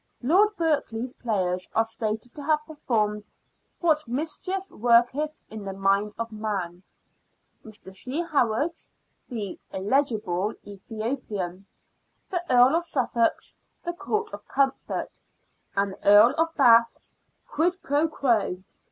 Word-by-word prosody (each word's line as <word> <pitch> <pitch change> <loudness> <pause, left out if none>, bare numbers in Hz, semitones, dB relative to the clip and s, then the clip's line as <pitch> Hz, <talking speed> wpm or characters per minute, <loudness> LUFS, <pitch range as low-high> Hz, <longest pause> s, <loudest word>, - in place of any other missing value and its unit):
Lord 400 - +4
Berkeley's 260 -7 -1
players 185 -6 -1
are 225 - +4
stated 225 +1 -3
to 295 - -7
have 305 +1 +1
performed 215 -9 -1 0.2
" - - -46
What 310 -5 +2
Mischief 330 +9 -1
Worketh 245 +7 +3 0.2
in 215 -1 -7
the 195 -1 -5
Mind 195 +2 +1
of 230 0 -4
Man 200 -5 -4 0.4
"; - - -45
Mr. 210 -3 -8
C. 260 - -1
Howard's 290 0 0 0.2
" - - -45
The 215 -6 -5
[illegible] 210 -3 0
Ethiopian 205 -3 -5 0.3
"; - - -45
The 355 -2 -1
Earl 250 +5 +6
of 345 - -1
Suffolk's 245 -7 0
" - - -46
The 345 - -3
Court 420 +4 -3
of - - -9
Comfort 270 -1 -1 0.3
"; - - -42
and 200 0 +2
the - - -14
Earl 210 +4 +7
of 325 0 0
Bath's 235 -4 +4 0.2
" - - -45
Quid 345 +4 +2
pro 290 +3 +2
quo." 230 - 0
235 Hz, 145 wpm, -26 LUFS, 210-300 Hz, 0.4 s, Earl